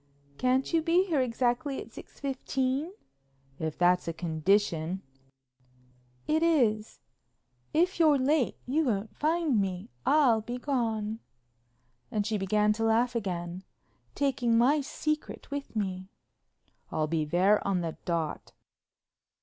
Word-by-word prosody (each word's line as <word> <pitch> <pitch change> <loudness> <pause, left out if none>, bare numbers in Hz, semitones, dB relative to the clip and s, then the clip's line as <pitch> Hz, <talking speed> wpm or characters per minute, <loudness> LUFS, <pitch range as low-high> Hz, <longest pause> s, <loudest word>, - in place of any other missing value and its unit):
"Can't 260 +4 +1
you 330 - +4
be 350 +4 +3
there 290 -4 +3
exactly 250 +3 0
at - - -9
six - - -12
fifteen?" 270 +2 -1 0.7
"If 160 -1 -3
that's 180 0 +3
a 165 - -1
condition." 170 +1 0 1.2
"It 315 +1 +1
is. 235 -10 +1 0.7
If 345 +3 +1
you're 310 -3 +5
late 270 0 +1
you 300 +5 +1
won't 210 -3 -2
find 310 -7 +1
me. 185 -8 -4
I'll 265 -7 +4
be 240 +3 -5
gone"—she 205 - -4
began 210 +2 +2
to 225 +1 -3
laugh 230 +2 +2
again—"taking 210 +6 -2
my 280 +6 +4
secret 305 +1 -4
with 280 -4 -5
me." 190 -3 -3 0.8
"I'll 155 - 0
be 155 0 0
there 180 +7 +3
on 190 -3 +1
the 165 -2 -3
dot." 165 -3 -3
225 Hz, 115 wpm, -29 LUFS, 180-275 Hz, 1.2 s, you're